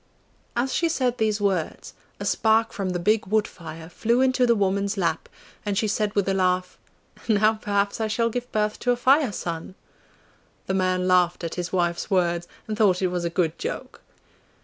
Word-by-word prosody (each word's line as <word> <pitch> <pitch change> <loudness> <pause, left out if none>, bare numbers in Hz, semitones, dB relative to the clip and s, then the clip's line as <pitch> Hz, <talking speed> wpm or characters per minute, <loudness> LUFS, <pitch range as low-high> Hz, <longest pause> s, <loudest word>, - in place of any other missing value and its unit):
As 250 +2 0
she 335 - +1
said 255 -6 0
these 215 -1 +1
words, 190 -5 -2 0.3
a - - -5
spark 220 0 +2
from 195 -2 -2
the 180 - -1
big 210 +4 +1
wood 215 +1 +2
fire 160 -1 -10
flew 230 +7 0
into 255 -1 +3
the 235 - +4
woman's 200 0 0
lap, 165 -4 -1 0.3
and 205 -2 -2
she 215 - +1
said 210 0 -1
with 200 -2 +1
a 195 - +2
laugh, 180 -1 0 0.5
'Now 215 0 +4
perhaps 205 0 -1
I 220 - +1
shall 230 +2 0
give 245 +1 -4
birth 210 0 0
to 245 - -2
a 245 - +4
Fire 265 +1 +3
son!' 170 -1 -5 0.9
The 190 - -2
man 185 -1 +1
laughed 180 -1 +3
at 165 - -3
his 175 -1 -4
wife's 175 0 0
words, 175 -3 +1 0.2
and 215 - -2
thought 195 -4 +3
it 185 - +2
was 175 -1 -2
a - - 0
good 170 -2 -1
joke. 475 +4 -5
200 Hz, 195 wpm, -24 LUFS, 180-220 Hz, 0.9 s, the